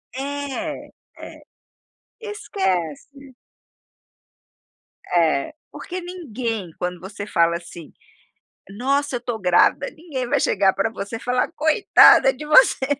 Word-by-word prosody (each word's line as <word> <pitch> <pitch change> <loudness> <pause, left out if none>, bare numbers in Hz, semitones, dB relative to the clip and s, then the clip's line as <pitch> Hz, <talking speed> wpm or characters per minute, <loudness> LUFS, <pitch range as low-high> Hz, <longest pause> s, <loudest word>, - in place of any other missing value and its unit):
É, 285 +3 -5 0.3
é, - - -11 0.8
esquece. 255 - -4 1.7
É, 165 - +1 0.2
porque 365 0 -7
ninguém, 240 - -5
quando 180 0 -4
você 200 +2 -8
fala, 170 -4 +1
assim: 170 -1 -12 0.8
"Nossa 270 +5 -1
eu - - -5
tô 235 -2 -4
grávida!" 180 +8 +2
ninguém 290 -7 -6
vai 285 0 +1
chegar 195 -1 +2
pra 195 +3 -1
você 205 +1 -6
e - - -9
falar: 250 0 -1
"Coitada 390 +9 +5
de 300 - -9
você 270 -3 +5
245 Hz, 110 wpm, -21 LUFS, 190-285 Hz, 1.7 s, Coitada